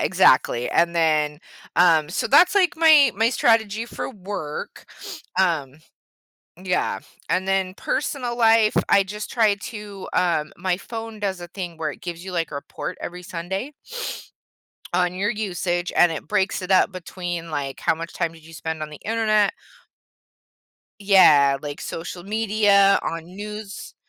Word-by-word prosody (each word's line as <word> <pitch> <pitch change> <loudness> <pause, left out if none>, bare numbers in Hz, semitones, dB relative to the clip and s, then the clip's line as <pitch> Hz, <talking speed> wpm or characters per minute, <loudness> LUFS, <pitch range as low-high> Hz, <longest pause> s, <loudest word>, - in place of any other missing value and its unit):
exactly, 120 +1 +3
and 170 0 +2
then, 155 -2 +1 0.4
um 165 -3 +4
so, - - -1
that's, 350 +7 +5
like, 370 -6 +3
my 310 -5 +6
my 225 +2 +3
strategy 225 -2 +2
for 240 - -5
work, 190 - -7 0.5
um 155 -7 +1 0.9
yeah, 185 -1 0 0.3
and 185 +1 0
then 190 -1 0
personal 255 -2 -2
life, 225 -2 +4
I 200 - +5
just 210 +2 -7
try 220 -4 +3
to, 205 -2 -8
um 160 -4 +1
my 185 0 -1
phone 225 0 -7
does 190 -3 -2
a 175 - -8
thing 175 -3 -7
where 155 -2 -2
it - - -11
gives 175 0 -7
you, 190 - -7
like, 170 -2 -1
a - - -8
report 140 +5 -6
every 180 +1 -7
Sunday 190 - -5 1.2
on 180 0 +1
your 200 +4 0
usage 180 -5 -2
and 175 -2 +5
it 155 - -7
breaks 195 -2 0
it 180 - -6
up 190 +1 +4
between, 175 -2 -6
like, 140 -3 -4
how - - +1
much 165 +1 -7
time 170 -2 -2
did 160 -1 -17
you 165 - -14
spend 160 -1 -5
on 155 0 -5
the 150 - -11
internet 215 -2 +2 1.5
Yeah, 150 -9 +6
like, 145 0 -7
social 175 +1 -6
media, 205 -1 +3
on 165 -1 -4
news 205 +3 -8
185 Hz, 155 wpm, -23 LUFS, 165-210 Hz, 1.5 s, my